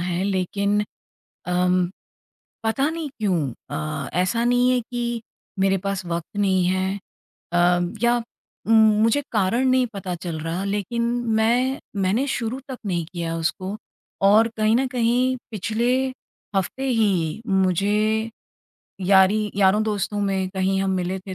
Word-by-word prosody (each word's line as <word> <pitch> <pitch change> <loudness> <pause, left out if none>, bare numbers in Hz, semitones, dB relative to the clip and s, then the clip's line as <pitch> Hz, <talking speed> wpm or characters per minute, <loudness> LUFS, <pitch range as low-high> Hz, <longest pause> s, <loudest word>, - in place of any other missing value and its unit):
है। 175 0 -1
लेक़िन 200 +2 0 0.7
अम 180 0 +2 0.8
पता 270 +6 +1
नहीं 325 -2 -4
क्यों 180 -9 0 0.2
अ, 75 0 -3
ऐसा 230 +6 +1
नहीं 245 +1 +3
है 250 - +2
कि 240 -1 -2 0.4
मेरे 195 0 +2
पास 195 -2 -2
वक़्त 170 +3 -4
नहीं 190 -3 +2
है 190 +2 0 0.5
अम 175 0 +2
या 240 0 +4 0.5
उम, 225 - +2 0.3
मुझे 230 +6 +3
कारण 220 +5 +2
नहीं 255 0 +3
पता 190 -2 -4
चल 170 -2 -5
रहा 165 +4 -3
लेक़िन 205 +4 -2 0.4
मैं 250 +4 +2 0.2
मैंने 220 +9 +1
शुरू 250 0 -2
तक 260 - -6
नहीं 175 -4 -1
किया 170 -1 -3
उसको 185 +5 -2 0.5
और 220 +3 +6
कहीं 215 +1 +2
न 265 - +1
कहीं 250 +1 +1
पिछले 220 +3 -1 0.7
हफ्ते 230 +8 -1
ही 200 -7 +1
मुझे 205 +4 +1 0.8
यारी 200 +2 +4
यारों-दोस्तों 205 +1 +2
में 190 -2 0
कहीं 190 0 +1
हम 195 - 0
मिले 185 +1 -2
थे 190 -1 -7
200 Hz, 135 wpm, -23 LUFS, 185-230 Hz, 0.8 s, और